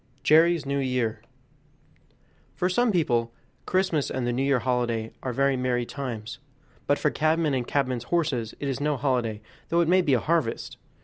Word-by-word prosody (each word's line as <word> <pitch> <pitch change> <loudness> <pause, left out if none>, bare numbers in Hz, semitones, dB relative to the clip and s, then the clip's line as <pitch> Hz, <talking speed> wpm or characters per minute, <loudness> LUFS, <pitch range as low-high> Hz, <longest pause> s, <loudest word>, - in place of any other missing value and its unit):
45 - - -38
Jerry's 165 +1 +4
New 140 0 -1
Year 125 -4 -1 1.3
For 180 - 0
some 240 +5 +2
people 120 - +1 0.4
Christmas 185 -6 +1
and 130 -2 -2
the 120 - 0
New 125 - -1
Year 135 -2 +1 0.6
are 130 - -3
very 135 +2 +2
merry 125 -1 0
times; 115 -5 -6 0.5
but 145 - +3
for 150 - +1
cabmen 155 0 +1
and 125 -2 -1
cabmen's 130 -4 -1
horses 135 -10 -1
it 140 - -3
is 135 -1 -2
no 150 -1 0
holiday, 120 -5 -1 0.3
though 170 +1 +3
it 170 - +1
may 185 +2 +5
be 140 -6 +2
a - - +2
harvest. 155 -4 -1
140 Hz, 175 wpm, -26 LUFS, 125-160 Hz, 1.3 s, may